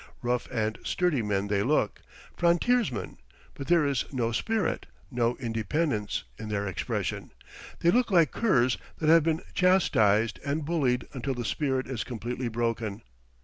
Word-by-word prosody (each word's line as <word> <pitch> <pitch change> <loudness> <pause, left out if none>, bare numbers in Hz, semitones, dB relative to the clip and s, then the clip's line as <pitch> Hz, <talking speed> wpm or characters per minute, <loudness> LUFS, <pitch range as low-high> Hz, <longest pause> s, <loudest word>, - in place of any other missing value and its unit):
Rough 120 0 0
and 110 -3 -2
sturdy 175 -8 +1
men 100 -2 -1
they 100 -1 +1
look 145 +9 +1 0.3
frontiersmen; 170 - +1 0.3
but 135 - -8
there 170 -3 +4
is 140 -3 +1
no 120 -4 -1
spirit, 220 - -1 0.2
no 120 -1 +1
independence, 115 - -1 0.2
in 110 - -6
their 100 -1 -1
expression; 95 - -3 0.5
they 170 - +5
look 245 +3 +2
like 170 -7 +4
curs 130 - +2 0.2
that 155 - 0
have 165 +1 +7
been 160 +2 0
chastised 110 - +3
and 145 +2 -2
bullied 135 -7 0
until 130 +1 -3
the 120 -1 -4
spirit 135 -2 0
is 130 -4 -3
completely 120 +1 -4
broken. 115 -3 -2
125 Hz, 145 wpm, -28 LUFS, 110-160 Hz, 0.5 s, have